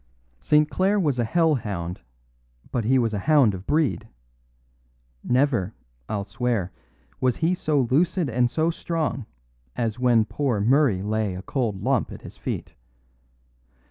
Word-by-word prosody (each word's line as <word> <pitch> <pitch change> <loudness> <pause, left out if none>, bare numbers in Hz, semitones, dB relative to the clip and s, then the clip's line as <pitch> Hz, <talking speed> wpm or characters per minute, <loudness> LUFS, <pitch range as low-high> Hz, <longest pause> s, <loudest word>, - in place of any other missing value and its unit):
"St. 150 0 +3
Clare 195 +5 +1
was 145 -9 0
a - - +3
hell 165 +6 +2
hound, 95 - -4 0.7
but 120 -4 -1
he 130 +4 +4
was 115 -3 +1
a 105 - -1
hound 140 -3 +4
of 95 +1 -8
breed. 145 -7 +1 1.2
Never, 125 -6 +1 0.3
I'll 100 -2 -2
swear, 115 -4 -2 0.5
was 125 -2 +2
he 165 +3 +1
so 155 -5 +1
lucid 160 +7 +1
and 120 0 +1
so 160 +6 +1
strong 160 -8 -3 0.5
as 115 -1 -2
when 120 -3 +4
poor 130 -4 -1
Murray 120 -3 +3
lay 105 -2 -1
a 90 - -7
cold 115 -8 -2
lump - - +1
at - - -10
his - - -10
feet. - - -5
125 Hz, 145 wpm, -24 LUFS, 110-150 Hz, 1.2 s, he